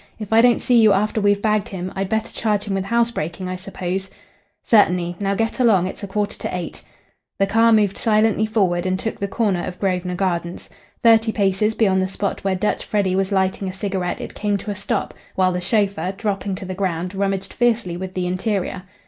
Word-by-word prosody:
"If 215 -1 -5
I 225 - +7
don't 240 0 +4
see 240 -2 +4
you 215 -2 +6
after 215 +2 0
we've 205 0 +2
bagged 215 -2 +1
him 185 -1 -5
I'd 195 0 -2
better 220 0 -1
charge 210 -2 0
him 205 - -3
with 195 0 -1
housebreaking, 195 -6 -1
I 185 - -3
suppose?" 190 0 -4 0.5
"Certainly. 180 -5 +3
Now 200 -1 0
get 225 +4 -1
along. 215 -8 +4
It's 190 - -6
a 200 - -5
quarter 205 +1 -2
to - - -4
eight." 175 - -6 0.6
The 195 - +3
car 225 +3 +4
moved 210 -3 +3
silently 220 -1 +2
forward 185 -5 +1
and 185 0 0
took 220 +4 -4
the 200 - -1
corner 195 -4 0
of 180 - -6
Grosvenor 180 -2 -1
Gardens. 175 -2 -2 0.3
Thirty 225 -1 +5
paces 205 +1 +1
beyond 190 -4 +3
the 185 - 0
spot 195 +1 -3
where 195 -1 +1
Dutch 200 +3 -1
Freddy 195 -3 0
was 195 +1 0
lighting 190 0 0
a - - -6
cigarette 190 -2 -3
it - - -7
came 205 -1 -1
to 205 +2 -5
a - - -4
stop, 200 0 -2 0.2
while 185 -1 +3
the 180 0 -2
chauffeur, 200 -1 0
dropping 200 -2 -2
to 190 - -7
the 185 - -4
ground, 180 -1 -2
rummaged 195 0 -2
fiercely 235 -7 +1
with 185 +1 -6
the 180 -1 -1
interior. 185 0 -2
195 Hz, 210 wpm, -21 LUFS, 185-215 Hz, 0.6 s, I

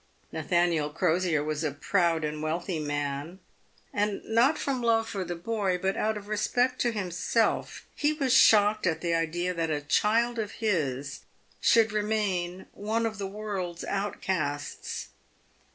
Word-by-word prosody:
Nathaniel 165 -1 +1
Crosier 160 0 +1
was 155 +1 -2
a 155 - +1
proud 165 +3 +1
and 150 0 -3
wealthy 165 +2 -2
man, 145 +2 -3 0.6
and 205 0 -1
not 235 +7 +3
from 270 -3 -2
love 225 -1 +2
for 200 -4 -3
the 175 -1 -4
boy, 195 0 -1
but 190 +2 -1
out 215 0 0
of 205 -1 -9
respect 245 +4 +1
to 240 - +2
himself, 205 +2 -1
he 295 0 +2
was 275 -5 0
shocked 210 -5 +5
at 160 -2 0
the 170 -1 0
idea 170 +2 0
that 165 -2 -1
a 150 -1 0
child 230 +10 +2
of 215 -2 -3
his 145 - -1 0.4
should 225 -2 +4
remain 205 -4 -1
one 220 +3 -1
of 215 -2 -3
the 195 - -2
world's 195 -4 -4
outcasts. 170 -7 -3
190 Hz, 150 wpm, -28 LUFS, 160-215 Hz, 0.6 s, shocked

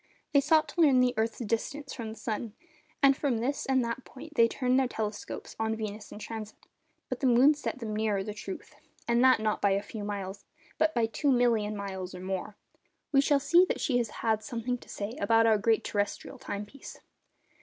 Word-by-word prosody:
They 280 - +6
sought 310 +2 +3
to 345 - -1
learn 280 -5 +6
the 250 0 +3
earth's 220 +1 -1
distance 275 +6 -3
from 230 -3 -5
the 220 - -8
sun, 220 0 -4 0.5
and 275 0 +7
from 270 -4 0
this 265 +6 -2
and 260 -2 +2
that 235 +2 -4
point 310 +4 -12
they 230 -6 +5
turned 255 +2 +1
their 265 - +2
telescopes 210 -3 -5
on 220 0 0
Venus 215 -1 -6
in - - -8
transit; 215 0 -7 0.5
but - - -4
the 270 - +2
moon 255 +5 +6
set 295 -3 -4
them 220 -4 -4
nearer 210 -2 0
the 210 - -5
truth, 200 -2 -8 0.3
and 235 +1 +3
that 260 -2 +6
not 215 -1 -1
by 200 - +4
a 200 +1 0
few 210 0 -7
miles, 200 -1 -5 0.4
but 315 -1 +2
by 235 -1 +3
2,000,000 235 -4 +2
miles 190 -2 -5
or - - -7
more. 190 +2 -4 0.5
We 275 -2 +5
shall 285 0 +3
see 340 +6 +5
that - - -2
she 250 -4 +1
has 235 -3 -1 0.2
had 220 -1 +2
something 245 +1 -3
to - - -17
say 210 +4 -5
about 225 -5 +4
our 220 -2 +4
great 225 +1 +2
terrestrial 205 -1 -3
time 205 +1 -5
piece. 270 +6 -11
230 Hz, 210 wpm, -29 LUFS, 210-260 Hz, 0.5 s, and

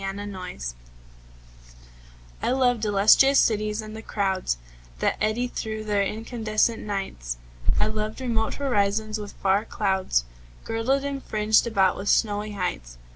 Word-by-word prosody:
7 195 0 -3
Autoplay 185 - -6 1.7
I - - 0
loved 245 -3 +2
illustrious 215 +7 +6
cities 215 0 +1
and 215 0 -8
the 220 - -7
crowds 190 - -1 0.4
That - - +1
eddy 215 +3 +1
through 220 -3 -4
their 205 -1 +1
incandescent 220 +1 0
nights. 195 - -4 0.4
I - - +4
loved 215 +1 -3
remote 230 -4 -1
horizons 215 -4 0
with 205 -1 -7
far 195 +2 +1
clouds 190 - 0 0.4
Girdled, 250 +5 0
and 280 -1 -3
fringed 215 +1 +2
about 195 -5 +2
with 200 - -3
snowy 210 -1 +1
heights. 170 - -4
215 Hz, 130 wpm, -25 LUFS, 195-225 Hz, 1.7 s, illustrious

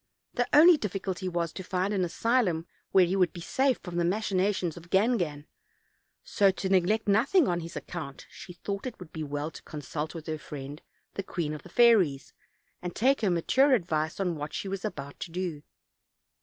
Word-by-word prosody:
The 245 0 0
only 320 +3 +8
difficulty 190 -4 -3
was 170 -2 -2
to 190 - -6
find 185 +2 -1
an 190 -2 +1
asylum 180 -2 +1 0.3
where 190 -2 +6
he 180 +2 -1
would 180 -3 +3
be 175 - -8
safe 260 +9 +1
from 175 -2 -5
the 175 - +2
machinations 190 -2 0
of 170 0 -12
Gangan: 185 -9 +1 0.8
so, 200 -2 +3
to 190 0 -2
neglect 195 +4 +2
nothing 265 - +4
on 175 -1 0
his 165 +1 -8
account, 145 -6 -7
she 180 - -10
thought 200 +6 -5
it 245 - -7
would 180 -4 -11
be 160 - -5
well 145 +1 -3
to - - -11
consult 150 +2 -5
with 160 -2 -7
her 155 -1 -4
friend, 145 0 -8 0.3
the - - -3
queen 170 -5 -3
of 150 - -7
the 180 - -14
fairies, 190 - +4 0.5
and 180 -1 -5
take 265 +4 +3
her 210 - +2
mature 260 - +4
advice 160 -6 -1
on 180 -3 0
what 150 0 -6
she - - -3
was 195 0 -4
about 145 -9 -6
to 175 - -5
do. 170 -3 -4
180 Hz, 195 wpm, -28 LUFS, 160-205 Hz, 0.8 s, only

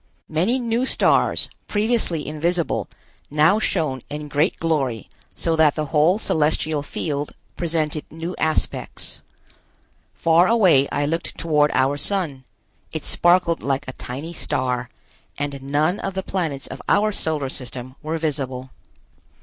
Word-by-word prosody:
Many 180 +11 +2
new 240 +1 0
stars, - - +3 0.2
previously 210 -7 +1
invisible, 165 +3 -1 0.4
now 155 +8 +4
shone 155 - 0
in 150 0 -5
great 145 +4 +1
glory 135 -9 -1 0.2
so 165 - 0
that 155 -2 +4
the 155 - -1
whole 160 +6 +5
celestial 155 -5 +1
field 145 0 -3 0.2
presented 155 -3 0
new 165 +3 -5
aspects. 155 0 -1 0.9
Far 165 +2 +4
away 185 - +5
I 145 - 0
looked 165 +3 -3
toward 150 -2 +3
our 135 +2 +2
Sun; 145 -6 -1 0.5
it 160 - -4
sparkled 175 -1 +3
like 140 +1 -1
a 130 - -5
tiny 140 +9 -6
star, 125 -5 -1 0.5
and 145 -1 -3
none 150 +7 +1
of 195 -1 -4
the 190 - -2
planets 160 -9 -2
of 135 - -7
our 215 +1 +4
Solar 155 -7 -1
System 130 -1 -7
were 160 +1 -2
visible. 135 -5 -3
155 Hz, 135 wpm, -22 LUFS, 140-170 Hz, 0.9 s, whole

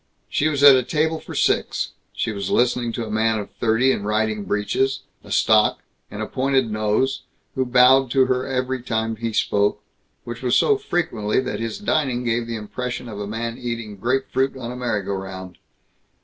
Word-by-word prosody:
She 150 - +1
was 145 -2 0
at 140 -2 +10
a 130 - +3
table 160 +5 0
for - - -10
six. - - 0 0.2
She - - -2
was 100 -2 -4
listening 120 -1 +1
to 115 - -3
a 110 - -7
man 110 +1 +1
of 105 - -6
thirty 120 +3 +3
in - - -1
riding 105 0 -1
breeches, 130 +6 0 0.2
a - - -13
stock, 110 -1 +3 0.3
and - - -5
a - - -2
pointed 130 -3 0
nose, 110 +5 0 0.3
who 130 -1 -1
bowed 125 +1 +5
to 130 +1 +4
her 130 0 -1
every 130 -1 -2
time 110 -2 -2
he 115 +1 -3
spoke, 105 -1 +1 0.4
which 120 0 -7
was 125 -2 +1
so 430 - +4
frequently 160 - -1
that 130 - -4
his 115 -1 -3
dining 140 -11 0
gave 120 -1 -1
the 115 - -3
impression 125 +3 -5
of 105 -3 -7
a 100 - -4
man 115 +2 -4
eating 115 -3 -5
grape 130 +7 0
fruit 135 0 +1
on 120 -2 -6
a - - -6
merry 120 -5 -2
go 100 +1 -3
round. 95 -1 -7
120 Hz, 195 wpm, -22 LUFS, 110-130 Hz, 0.4 s, at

